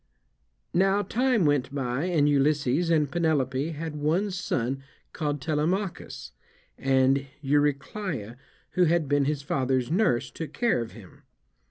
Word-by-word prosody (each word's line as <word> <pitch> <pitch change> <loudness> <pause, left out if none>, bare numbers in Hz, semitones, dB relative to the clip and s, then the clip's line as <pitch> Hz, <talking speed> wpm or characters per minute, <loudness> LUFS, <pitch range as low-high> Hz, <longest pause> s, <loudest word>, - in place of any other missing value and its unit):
Now 195 +3 +3
time 240 -1 +1
went 145 -2 +1
by, 130 +2 -1
and 160 -5 +2
Ulysses 145 +2 +2
and 150 -4 +2
Penelope 150 -4 0
had 155 0 -5
one 165 +8 0
son 135 -8 -2 0.3
called 145 -1 -2
Telemachus; 165 +7 -2 0.4
and 135 +1 +2 0.2
Eurycleia, 145 - -1 0.4
who 180 - +3
had 165 -2 +2
been 145 0 +2
his 145 -1 -1
father's 130 -2 0
nurse, 130 - +1
took 160 +4 -7
care 235 - +1
of 115 - -6
him. 100 -6 -14
145 Hz, 130 wpm, -27 LUFS, 135-170 Hz, 0.4 s, Now